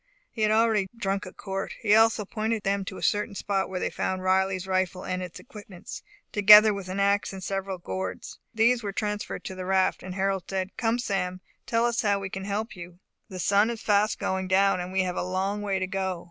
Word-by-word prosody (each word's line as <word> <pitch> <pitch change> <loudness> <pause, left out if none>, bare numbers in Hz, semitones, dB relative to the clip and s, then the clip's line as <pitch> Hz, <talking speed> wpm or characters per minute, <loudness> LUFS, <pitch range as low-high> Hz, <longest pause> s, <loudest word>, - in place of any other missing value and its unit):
He 225 - -6
had 215 - +3
already 220 -2 +3
drunk 195 -3 -2
a - - -8
quart. 195 -1 -5
He 210 -2 +2
also 225 -1 +4
pointed 220 +1 -2
them 200 0 0
to 190 - -7
a - - -8
certain 210 0 0
spot, 195 -1 -1
where 185 -1 -3
they - - -2
found 185 0 -2
Riley's 190 0 +1
rifle 185 -1 -1
and 185 0 -2
its 180 -2 -7
equipments, 205 -7 -10 0.3
together 210 +1 +8
with 195 -2 -6
an 190 +2 -3
ax 200 0 +1
and 190 -1 -8
several 195 0 -3
gourds. 95 - -6
These 235 +2 +3
were 200 -3 -4
transferred 210 0 -3
to - - -6
the 185 0 -6
raft; 190 0 +2
and 185 0 -7
Harold 195 -1 -1
said, 190 0 -3
"Come, 230 0 0
Sam, 185 -6 -2 0.3
tell 230 0 +2
us 235 0 +1
how 205 -2 +2
we 195 -1 -5
can 190 0 -5
help 210 +3 -3
you. 175 -1 -10 0.3
The 185 - -7
sun 200 +4 +3
is 235 -2 -5
fast 210 0 +2
going 190 0 -2
down, 195 0 +3
and 180 +1 -5
we 190 0 +1
have 180 0 -3
a - - 0
long 190 +3 -2
way 200 -2 -1
to 190 - -1
go. 190 -2 -2
195 Hz, 225 wpm, -26 LUFS, 185-210 Hz, 0.3 s, together